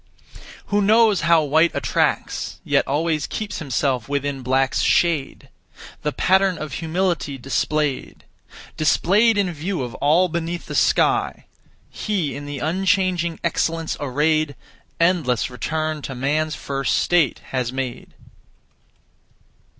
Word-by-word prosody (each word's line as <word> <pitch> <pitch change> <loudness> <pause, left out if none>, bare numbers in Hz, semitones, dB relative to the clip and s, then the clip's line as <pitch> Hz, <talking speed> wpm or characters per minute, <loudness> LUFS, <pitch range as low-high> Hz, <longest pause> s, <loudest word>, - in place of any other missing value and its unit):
Who 205 - +4
knows 215 -1 +4
how 165 -2 +5
white 160 +4 +3
attracts, - - -1
Yet - - +1
always 155 +1 0
keeps 210 -3 -5
himself 135 -3 -1
within 140 -1 -2
black's 130 +1 +1
shade, 165 -6 +1 0.5
The 150 - -1
pattern 190 +2 +2
of 155 -3 -6
humility 165 -3 -1
displayed, 140 +2 -2 0.5
Displayed 200 +9 +3
in 190 -3 0
view 165 0 -3
of 120 -2 -6
all 160 +6 +4
beneath 170 0 -4
the - - -7
sky; - - +1 0.5
He 180 - -2
in 145 +1 -7
the 145 -1 -5
unchanging 180 +2 0
excellence 165 -1 -1
arrayed, 150 +2 0 0.4
Endless 165 -9 +1
return 155 +4 -3
to 135 - -6
man's 150 +4 -1
first 135 -1 -1
state 175 -5 +2
has 125 -2 -1
made. 130 -2 -5
155 Hz, 120 wpm, -21 LUFS, 140-175 Hz, 0.5 s, how